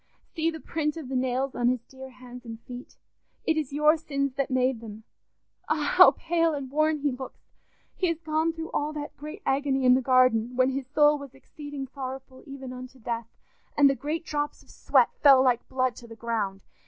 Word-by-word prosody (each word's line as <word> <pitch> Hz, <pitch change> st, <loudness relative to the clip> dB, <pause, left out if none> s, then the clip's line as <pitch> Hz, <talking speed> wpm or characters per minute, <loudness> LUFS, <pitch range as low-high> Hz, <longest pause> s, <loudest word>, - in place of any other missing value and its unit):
"See 325 Hz, -1 st, +1 dB
the 320 Hz, -1 st, -6 dB
print 300 Hz, +2 st, -2 dB
of 295 Hz, -6 st, -7 dB
the 265 Hz, -, -3 dB
nails 260 Hz, +1 st, 0 dB
on 240 Hz, -, 0 dB
his 250 Hz, -1 st, +1 dB
dear 265 Hz, +1 st, -11 dB
hands 250 Hz, -1 st, -12 dB
and 225 Hz, -2 st, -8 dB
feet. 250 Hz, +2 st, -10 dB, 0.5 s
It 320 Hz, -, +2 dB
is 305 Hz, -4 st, -2 dB
your 300 Hz, +3 st, +4 dB
sins 275 Hz, -3 st, -2 dB
that 275 Hz, 0 st, -2 dB
made 255 Hz, -2 st, +1 dB
them! 220 Hz, -1 st, -10 dB, 0.7 s
Ah! -, -, 0 dB
How -, -, +10 dB
pale 330 Hz, -1 st, +1 dB
and 270 Hz, -2 st, -6 dB
worn 310 Hz, +1 st, +2 dB
he 290 Hz, -1 st, +1 dB
looks! 260 Hz, +1 st, -9 dB, 0.4 s
He 370 Hz, -, 0 dB
has 335 Hz, -2 st, -1 dB
gone 315 Hz, 0 st, 0 dB
through 325 Hz, 0 st, -7 dB
all 300 Hz, +1 st, -1 dB
that 295 Hz, -1 st, -6 dB
great 305 Hz, +7 st, -9 dB
agony 270 Hz, -1 st, +1 dB
in 250 Hz, -, +7 dB
the 260 Hz, -, +3 dB
garden, 255 Hz, -2 st, +3 dB
when 255 Hz, +1 st, +3 dB
his 265 Hz, -1 st, -4 dB
soul 295 Hz, +1 st, +4 dB
was 280 Hz, -2 st, -11 dB
exceeding 290 Hz, 0 st, -8 dB
sorrowful 265 Hz, 0 st, -8 dB
even 270 Hz, -2 st, -8 dB
unto 255 Hz, +1 st, -10 dB
death, 230 Hz, -1 st, -4 dB, 0.5 s
and 285 Hz, -1 st, +7 dB
the 275 Hz, -, +4 dB
great 310 Hz, +4 st, -4 dB
drops 295 Hz, -1 st, -3 dB
of -, -, -19 dB
sweat -, -, +2 dB
fell 270 Hz, -3 st, +7 dB
like 245 Hz, -2 st, +1 dB
blood 255 Hz, -1 st, 0 dB
to 235 Hz, -, -11 dB
the 225 Hz, -, -11 dB
ground. 215 Hz, -5 st, -3 dB
270 Hz, 205 wpm, -27 LUFS, 255-300 Hz, 0.7 s, How